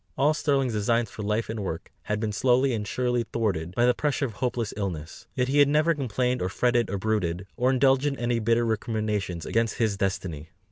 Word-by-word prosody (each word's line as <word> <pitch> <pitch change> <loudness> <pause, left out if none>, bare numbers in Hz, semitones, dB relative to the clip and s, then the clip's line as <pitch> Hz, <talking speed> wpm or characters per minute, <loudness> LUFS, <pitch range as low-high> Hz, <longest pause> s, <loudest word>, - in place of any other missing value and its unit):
All 145 +3 +4
Sterling's 140 -6 +1
designs 115 +1 +1
for - - -7
life 105 +2 -1
and 110 0 -4
work 90 -5 -5
had 105 0 -1
been 110 -1 -1
slowly 125 +4 +2
and 105 -2 -3
surely 125 +1 0
thwarted 95 -7 -1
by 120 - +3
the 125 - +5
pressure 145 +2 0
of 115 - -5
hopeless 120 -2 -2
illness; 85 -6 -5
yet 125 -1 +1
he 140 +2 +2
had 145 - +7
never 155 +3 +3
complained 125 -3 -1
or 90 - 0
fretted 120 +2 +1
or 100 - -2
brooded, 95 -4 -1
or 125 +1 +2
indulged 135 +1 +3
in 140 -1 -1
any 120 -1 0
bitter 115 +1 +2
recriminations 105 -6 -2
against 115 0 0
his 110 -4 +1
destiny. 90 -5 -3
115 Hz, 205 wpm, -26 LUFS, 100-125 Hz, -, had